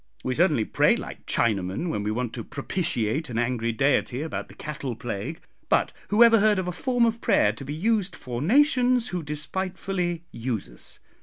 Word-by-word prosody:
We 130 - -1
certainly 150 - +3
pray - - +3
like - - -8
Chinamen 100 - 0
when 105 - -2
we 105 - -2
want 120 +1 -2
to 115 - -5
propitiate 140 - -2
an 115 - -4
angry 115 -1 0
Deity 135 +2 +1
about 160 - -4
the - - -15
cattle 140 -5 -5
plague; 120 - -5 0.3
but - - +2
who 210 +3 +6
ever 230 -1 +7
heard 210 0 +4
of 185 -1 -1
'a - - -1
form 245 +6 +1
of 230 0 -1
prayer 105 - +3
to 115 - -9
be 145 +2 -5
used' 195 +1 0
for 120 -1 -5
nations 250 - +3
'who 180 -1 -3
despitefully 175 +3 -3
use 115 -3 -3
us.' - - -10
150 Hz, 185 wpm, -25 LUFS, 120-195 Hz, 0.3 s, ever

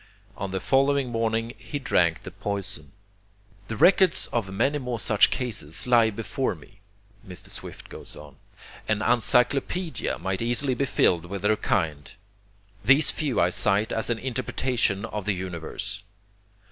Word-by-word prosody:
On 100 - -4
the 95 0 -2
following 135 +3 +2
morning 115 0 -1
he 145 - -5
drank 85 - +1
the 95 - -8
poison. 100 -6 -4 0.8
"The 115 - -5
records 190 - +5
of 105 -5 -1
many 135 +9 +1
more 125 -3 -4
such 105 -1 +5
cases 110 - -3
lie 120 -3 +5
before 115 +3 -2
me 95 +6 -18 0.5
[Mr. 90 -1 -9
Swift - - -7
goes - - -7
on]; - - -13 0.5
an 110 0 0
encyclopedia 125 - +2
might 95 +3 -3
easily 120 +3 +1
be 140 +3 0
filled 85 -9 +2
with 100 +2 -6
their 105 +1 +3
kind. 80 -9 -1 0.7
These 135 +8 +5
few 145 -7 -1
I 90 +1 +3
cite 105 +2 +1
as 110 +1 0
an 120 - +1
interpretation 125 -4 -1
of 105 -3 -5
the 105 - +1
universe. 90 0 -5
110 Hz, 145 wpm, -25 LUFS, 95-125 Hz, 0.8 s, records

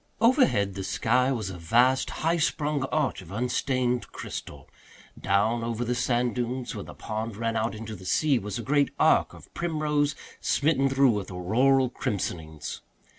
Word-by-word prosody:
Overhead 230 - +3
the 95 0 -5
sky 125 +7 +1
was 110 -7 -2
a 90 - -8
vast 120 +9 +3 0.2
high 165 +1 +3
sprung 150 -3 0
arch 135 -7 -1
of 90 -1 -13
unstained 125 +2 -1
crystal. 70 -3 -7 0.5
Down 110 +4 +1
over 115 +1 -2
the 120 - 0
sand 120 0 +1
dunes, 125 +1 -3
where 105 -3 -5
the - - -11
pond 110 0 -4
ran 115 0 -1
out 110 0 -1
into 110 0 -7
the 95 - -12
sea, 145 +4 +2
was 105 -1 -5
a 120 - -5
great 145 +2 +2
arc - - +3
of - - -16
primrose 150 -3 0 0.2
smitten 140 -2 +2
through 135 -1 +4
with 105 -3 -3
auroral 125 +8 +2
crimsonings. 80 -9 -4
120 Hz, 165 wpm, -27 LUFS, 105-135 Hz, 0.5 s, through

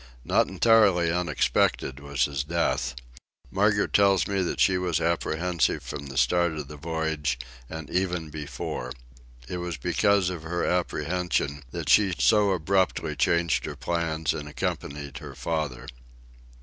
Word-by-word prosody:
Not - - +3
entirely 100 -7 +4
unexpected 85 -6 +1
was 70 -1 0
his 70 -2 -2
death. 85 -4 -1 0.6
Margaret 100 +1 +2
tells 100 -1 +4
me 100 -1 0
that 90 - -2
she 95 -1 +4
was 90 -3 0
apprehensive 85 0 0
from 70 - -6
the 65 -1 -7
start 85 +6 +3
of 75 -3 -5
the 75 - -9
voyage—and 75 -3 -4
even 90 -4 -1
before. 70 -4 -5 0.5
It 90 - -4
was 90 -2 -4
because 100 +7 +2
of 90 -3 -6
her 85 +2 -2
apprehension 85 -4 -1
that - - -5
she 100 -4 +5
so 105 -2 +4
abruptly 90 -3 +1
changed 85 +4 +1
her - - -5
plans 80 -3 -1
and 75 -2 -6
accompanied 70 -1 -4
her - - -9
father. 75 -6 -3
80 Hz, 135 wpm, -26 LUFS, 75-90 Hz, 0.6 s, she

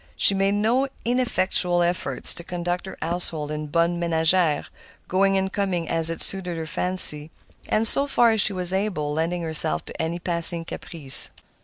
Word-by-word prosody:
She - - +2
made 195 +1 -1
no 235 +6 -1 0.2
ineffectual 185 -7 -1
efforts 175 +1 -3
to 170 - -4
conduct 175 +1 -6
her - - -11
household 160 -3 +2
en 150 0 -6
bonne 170 +3 -2
ménagère, 165 -1 0 0.4
going 195 +1 0
and 190 0 -4
coming 185 -5 -3
as 165 -1 +6
it 165 - -3
suited 180 -3 0
her 160 - -6
fancy, 155 -3 +2 0.4
and, 225 +1 0
so 280 +4 +3
far 240 -4 +2
as 220 -2 0
she 215 - +1
was 180 -1 +1
able, 185 -7 -3
lending 170 +3 -4
herself 155 - -2
to - - -8
any 165 +1 -4
passing 170 -1 +3
caprice. 150 -5 +3
175 Hz, 170 wpm, -21 LUFS, 165-195 Hz, 0.4 s, as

